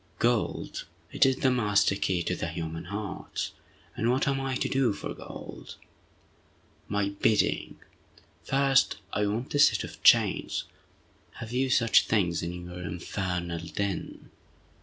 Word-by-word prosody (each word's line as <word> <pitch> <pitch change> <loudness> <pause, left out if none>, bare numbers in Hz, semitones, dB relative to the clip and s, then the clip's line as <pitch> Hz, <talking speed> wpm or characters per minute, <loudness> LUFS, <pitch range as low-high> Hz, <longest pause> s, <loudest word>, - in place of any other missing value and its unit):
"Gold! 120 -1 0 0.3
It - - +4
is 135 - +2
the 130 0 +2
master 105 -5 +3
key 95 -3 0
to 90 -1 -2
human 80 0 -5
hearts! 100 +2 -4 0.4
And 115 - 0
what 130 +4 +2
am 135 0 +1
I 135 -1 -2
to - - 0
do 130 -5 +2
for - - -5
gold?" - - -10 1.1
"My 100 -1 0
bidding! 100 +2 +1 0.7
First, 135 -3 +3 0.2
I 105 0 +1
want 115 +6 -3
a 145 - +1
set - - +5
of - - -9
chains! - - +4 0.7
Have 115 -1 -8
you 130 +2 +1
such 115 -3 +4
things 90 -6 +1
in 90 +1 -5
your 90 0 -8
infernal 90 0 -3
den?" 100 0 -4
105 Hz, 140 wpm, -28 LUFS, 90-125 Hz, 1.1 s, set